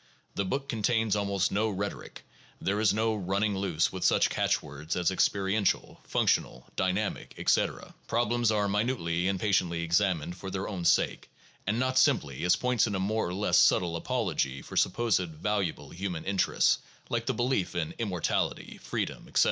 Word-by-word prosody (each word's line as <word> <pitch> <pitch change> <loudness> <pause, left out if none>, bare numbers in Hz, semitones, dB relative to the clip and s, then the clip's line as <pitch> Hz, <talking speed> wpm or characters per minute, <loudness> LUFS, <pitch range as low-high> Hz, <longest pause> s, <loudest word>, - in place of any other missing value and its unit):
The 100 - -1
book 135 +9 -2
contains 110 -1 +1
almost 100 -2 0
no 110 +2 +1
rhetoric. 100 0 -5 0.4
There 100 +2 -1
is 110 -2 +4
no 110 +2 +1
running 100 +1 0
loose 95 -4 0
with 95 - -5
such - - +3
catchwords 75 +3 -1
as 90 0 +1
experiential, 95 +2 0
functional, - - 0
dynamic, 95 +3 -1
etc. - - 0
Problems 120 0 +1
are 105 -2 +1
minutely 100 -5 0
and 95 -1 0
patiently 90 -5 +1
examined 85 -1 +1
for 95 +1 -7
their 95 0 -3
own 90 -4 -4
sake, - - +2 0.4
and 110 +3 +1
not 130 +1 +2
simply 105 - +2
as 90 - +5
points 125 -2 +1
in 105 - -2
a - - -1
more 110 +2 0
or 90 - -4
less 105 +2 +3
subtile 85 -2 +4
apology 70 -4 -1
for - - -10
supposed 110 -1 +2
valuable 95 +2 -2
human 90 -2 -4
interests, 100 -1 +2 0.3
like - - -2
the - - +1
belief 120 -8 0
in 85 -3 -2
immortality, 95 -7 -2
freedom, - - -4
etc. - - 0
100 Hz, 165 wpm, -29 LUFS, 90-110 Hz, 0.4 s, as